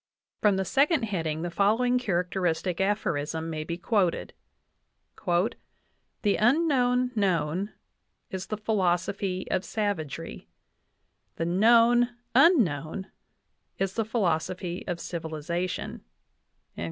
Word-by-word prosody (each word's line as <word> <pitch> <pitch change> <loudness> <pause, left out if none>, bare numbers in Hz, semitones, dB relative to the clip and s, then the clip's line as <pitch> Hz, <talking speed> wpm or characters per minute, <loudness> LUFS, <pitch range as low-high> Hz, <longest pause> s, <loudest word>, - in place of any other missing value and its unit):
From 210 -2 +4
the 190 0 -1
second 285 - +2
heading 165 -7 -2
the 175 - -3
following" 225 +7 +2
characteristic 180 -4 -1
aphorism 165 -5 -1
may 155 -1 -3
be 170 +2 -4
quoted: 185 -2 0 0.9
"The 195 +2 -2
unknown 250 -1 +3
known 185 -1 0 0.6
is 190 0 -5
the 215 - -3
philosophy 190 -2 0
of 185 - +1
savagery; 165 - -4 0.9
the 165 - -2
known 235 +6 +4 0.2
unknown 195 - +3 0.7
is 195 -1 -1
the 225 - 0
philosophy 185 -4 -1
of 175 - -2
civiliza 170 +1 -3
tion." - - -6
190 Hz, 100 wpm, -27 LUFS, 170-225 Hz, 0.9 s, From